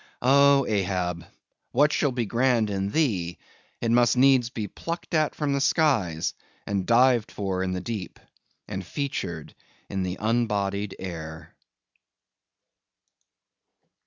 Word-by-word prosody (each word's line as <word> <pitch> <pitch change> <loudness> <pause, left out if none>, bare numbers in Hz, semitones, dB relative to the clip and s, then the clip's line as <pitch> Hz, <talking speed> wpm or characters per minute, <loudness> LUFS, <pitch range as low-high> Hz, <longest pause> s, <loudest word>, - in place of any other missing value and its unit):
Oh, 140 +1 +5
Ahab! 90 -4 -1 0.5
what 145 +4 +4
shall 145 - +1
be 120 -2 -1
grand 115 -1 +1
in 95 0 -1
thee, 100 - 0 0.4
it 115 - 0
must 120 +1 +4
needs 130 -2 +5
be 110 -4 -4
plucked 170 - -6
at 155 -2 +1
from 145 -2 -1
the 140 - 0
skies, 110 - +1 0.3
and 100 -2 -2
dived 120 -1 +4
for 95 -2 -2
in 95 0 -1
the 90 - -3
deep, 100 -4 -6 0.5
and 95 - -5
featured 90 - -4 0.4
in 95 - -2
the 90 0 -3
unbodied 105 -3 -1
air! 80 -3 -7
110 Hz, 125 wpm, -26 LUFS, 95-130 Hz, 0.5 s, Oh